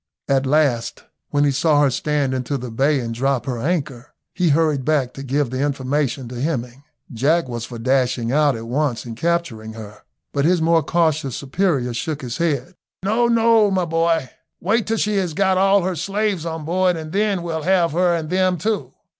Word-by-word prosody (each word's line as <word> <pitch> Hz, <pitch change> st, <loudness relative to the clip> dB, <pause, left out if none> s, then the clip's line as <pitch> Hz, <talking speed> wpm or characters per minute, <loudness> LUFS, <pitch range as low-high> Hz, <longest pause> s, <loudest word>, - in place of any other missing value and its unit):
At 135 Hz, -1 st, +1 dB
last, 135 Hz, -5 st, +1 dB, 0.3 s
when 145 Hz, 0 st, +1 dB
he 145 Hz, -, +3 dB
saw 145 Hz, +2 st, +3 dB
her 140 Hz, -, +3 dB
stand 140 Hz, 0 st, 0 dB
into 130 Hz, +2 st, -2 dB
the 125 Hz, -2 st, -7 dB
bay 140 Hz, +5 st, +2 dB
and 115 Hz, -2 st, -4 dB
drop 130 Hz, 0 st, 0 dB
her 125 Hz, -3 st, -3 dB
anchor, 140 Hz, -3 st, -3 dB, 0.2 s
he 180 Hz, -3 st, +1 dB
hurried 150 Hz, -2 st, +2 dB
back 135 Hz, -3 st, 0 dB
to 135 Hz, -, -8 dB
give 135 Hz, -1 st, -1 dB
the 130 Hz, +1 st, -2 dB
information 140 Hz, -2 st, -1 dB
to 125 Hz, -1 st, -6 dB
Hemming. 130 Hz, -4 st, -3 dB, 0.3 s
Jack 145 Hz, +7 st, +1 dB
was 120 Hz, -2 st, -5 dB
for 120 Hz, -, -8 dB
dashing 125 Hz, -1 st, 0 dB
out 145 Hz, -1 st, +3 dB
at 115 Hz, 0 st, -7 dB
once 125 Hz, 0 st, -1 dB
and 115 Hz, -2 st, -7 dB
capturing 135 Hz, -8 st, -2 dB
her, 105 Hz, -2 st, -10 dB, 0.3 s
but 140 Hz, -, +1 dB
his 175 Hz, +3 st, +3 dB
more 165 Hz, 0 st, +3 dB
cautious 155 Hz, -5 st, 0 dB
superior 140 Hz, -4 st, -1 dB
shook 150 Hz, +4 st, -4 dB
his 120 Hz, -1 st, -4 dB
head; 160 Hz, -2 st, -1 dB, 0.3 s
"No, 225 Hz, +5 st, +2 dB
no, 230 Hz, -2 st, +4 dB
my 185 Hz, -2 st, 0 dB
boy, 165 Hz, -4 st, 0 dB, 0.3 s
wait 215 Hz, +5 st, 0 dB
till 225 Hz, +1 st, 0 dB
she 210 Hz, -1 st, 0 dB
has 180 Hz, -5 st, -1 dB
got 190 Hz, 0 st, +2 dB
all 195 Hz, 0 st, +4 dB
her 185 Hz, 0 st, -1 dB
slaves 195 Hz, 0 st, -1 dB
on 160 Hz, -2 st, -5 dB
board 180 Hz, +1 st, +1 dB
and 155 Hz, -1 st, -7 dB
then 200 Hz, -2 st, 0 dB
we'll 165 Hz, -2 st, -3 dB
have 175 Hz, 0 st, +2 dB
her 175 Hz, +2 st, +2 dB
and 160 Hz, -1 st, -4 dB
them 185 Hz, -1 st, +2 dB
too." 215 Hz, +6 st, -2 dB
150 Hz, 195 wpm, -21 LUFS, 130-175 Hz, 0.3 s, no